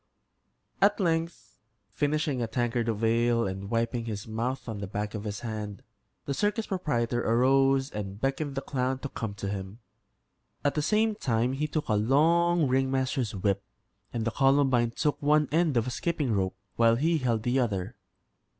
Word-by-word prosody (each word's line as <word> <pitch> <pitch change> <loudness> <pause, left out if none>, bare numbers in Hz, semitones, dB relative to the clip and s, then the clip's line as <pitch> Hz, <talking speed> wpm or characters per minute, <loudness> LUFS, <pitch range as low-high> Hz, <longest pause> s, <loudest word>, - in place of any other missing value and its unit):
At 200 +2 +4
length, 165 -2 -2 0.3
finishing 145 -1 0
a 115 - 0
tankard 120 0 -1
of 110 0 -2
ale, 115 +1 +2
and 95 +1 -4
wiping 115 +1 -1
his 105 -2 -5
mouth 120 +5 -3
on 110 -3 -4
the 100 - -4
back 105 +1 -4
of 105 -1 -5
his 105 -1 -4
hand, 105 -3 -5 0.4
the 140 - -2
circus 210 - 0
proprietor 120 -10 -1
arose 135 +3 +3
and 100 -1 -5
beckoned 135 +2 -1
the 135 - -3
clown 130 0 -1
to 140 +1 -6
come 110 -5 -5
to 100 - -5
him. 95 +1 -5 0.9
At 145 - +3
the 150 - 0
same 215 +6 +2
time 125 - 0
he 150 +3 -1
took 150 0 -3
a 110 - +1
long 160 +9 +3
ringmaster's 130 -3 0
whip, 100 0 0 0.5
and 115 -2 -2
the 115 - 0
Columbine 135 -3 +3
took 145 +5 -1
one 150 0 +3
end 160 -4 +2
of 115 - +2
a 125 - -3
skipping 150 -3 -1
rope, 95 -2 0 0.2
while 115 0 +5
he 160 +6 +1
held 115 -5 0
the 125 +3 +1
other. 105 -3 -1
125 Hz, 175 wpm, -28 LUFS, 110-145 Hz, 0.9 s, while